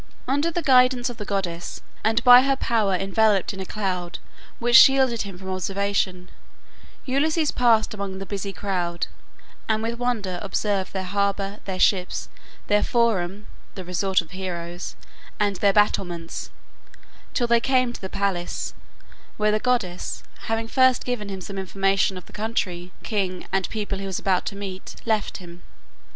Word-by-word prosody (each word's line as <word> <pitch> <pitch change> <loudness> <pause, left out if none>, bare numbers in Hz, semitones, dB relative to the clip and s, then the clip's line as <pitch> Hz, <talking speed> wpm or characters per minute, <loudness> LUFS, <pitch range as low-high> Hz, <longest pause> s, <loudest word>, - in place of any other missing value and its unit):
Under 285 +5 +1
the 335 0 -2
guidance 255 -2 +4
of 235 - -11
the 210 - -6
goddess, 175 -4 -3 0.2
and 225 +2 +2
by 245 0 +10
her 275 +1 +2
power 220 -7 +1
enveloped 195 +1 +2
in 195 - -8
a 190 - -5
cloud 185 -4 -3 0.4
which 240 0 +2
shielded 265 -2 +7
him 195 -3 -6
from 190 0 -6
observation, 185 -1 -1 0.7
Ulysses 305 +4 +1
passed 225 -4 +3
among 200 -2 -5
the 195 - -6
busy 200 0 -4
crowd, 175 -2 -2 0.6
and 220 0 +1
with 230 +1 -3
wonder 215 -8 -1
observed 200 -1 -1
their 190 -1 -3
harbor, 200 +1 -1
their 190 -2 -3
ships, 185 -1 +2 0.4
their 210 0 +3
forum 210 -4 +1 0.3
(the 185 - -7
resort 185 +2 +1
of 165 - -16
heroes), 175 -1 -5 0.4
and 205 -2 +1
their 200 +1 +4
battlements, 175 -5 0 0.9
till 245 - +2
they 235 0 +4
came 255 -1 +2
to - - -9
the 190 - -5
palace, 195 -3 -2 0.6
where 210 0 +2
the 215 - +1
goddess, 215 -8 -1 0.2
having 225 0 -1
first 260 +1 +3
given 240 -5 -3
him 190 -1 -5
some 195 +1 -6
information 195 0 +1
of 180 - -9
the - - -17
country, 185 -5 -2
king, 190 -4 -2
and 190 -1 0
people 205 -3 -3
he 195 - -4
was 190 - -3
about 185 -2 0
to 200 - -3
meet, 195 -2 -7
left 220 -3 0
him. 175 -1 -12
200 Hz, 160 wpm, -24 LUFS, 185-230 Hz, 0.9 s, by